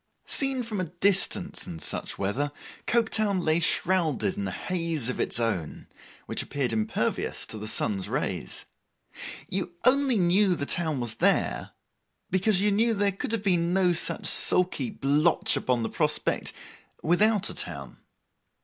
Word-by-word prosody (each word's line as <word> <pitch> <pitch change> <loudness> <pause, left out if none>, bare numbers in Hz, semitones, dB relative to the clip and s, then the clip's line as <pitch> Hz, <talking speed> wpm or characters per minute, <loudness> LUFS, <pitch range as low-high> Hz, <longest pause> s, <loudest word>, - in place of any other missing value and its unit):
Seen 270 -2 +1
from 215 -4 -3
a - - -1
distance 185 +2 0
in 85 - -6
such - - -3
weather, 125 +9 -1 0.4
Coketown 220 -4 +2
lay 155 +1 +3
shrouded 175 +1 +1
in 205 0 -3
a - - -4
haze 165 -8 -2
of 125 - -4
its - - 0
own, 105 -9 -2 0.4
which - - -1
appeared 135 -5 -2
impervious 110 -1 -1
to 110 - -7
the 105 - -6
sun's 100 -3 0
rays. - - -3 0.8
You 180 -2 -3
only 265 -2 +4
knew 185 +1 +3
the 140 - -3
town 160 -3 +1
was 120 -2 -3
there, - - +1 0.6
because 190 +1 +2
you 205 0 +3
knew 225 +3 +2
there 200 0 +2
could 195 - -5
have 225 -3 -1
been 175 -3 +2
no 185 -2 +3
such 170 - -1
sulky 180 +6 +3
blotch 150 -3 +1
upon 125 -2 0
the - - -1
prospect - - -1 0.5
without 205 +5 +2
a - - -4
town. - - -5
180 Hz, 150 wpm, -27 LUFS, 140-205 Hz, 0.8 s, only